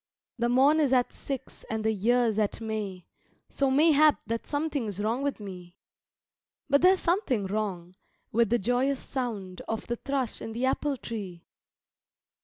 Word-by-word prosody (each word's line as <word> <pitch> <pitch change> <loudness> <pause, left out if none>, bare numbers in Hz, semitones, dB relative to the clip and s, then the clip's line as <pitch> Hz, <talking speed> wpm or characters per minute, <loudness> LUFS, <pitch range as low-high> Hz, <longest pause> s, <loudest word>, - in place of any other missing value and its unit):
The 235 0 +1
morn 275 +5 +5
is 280 -4 +3
at 250 -1 +2
six, 270 -3 -6
and 220 0 -2
the 220 - +2
year's 225 +1 +2
at 210 -2 0
May, 210 -5 -4 0.4
So 275 -1 +1
mayhap 305 +2 +5
that 230 0 -3
something 290 -4 -1
is 200 -2 -3
wrong 225 +5 0
with 280 -3 -2
me. 180 -4 -9 0.9
But 280 0 +4
there's 370 +1 +5
something 320 - +1
wrong, 190 -3 -3 0.4
With 230 -1 +3
the 240 - +3
joyous 250 +5 +1
song 210 -9 -4
Of 225 - -3
the 240 - -3
thrush 270 -3 -2
in 225 - -6
the 240 +3 -1
apple 275 +1 0
tree. 195 -8 -7
235 Hz, 160 wpm, -28 LUFS, 210-275 Hz, 0.9 s, morn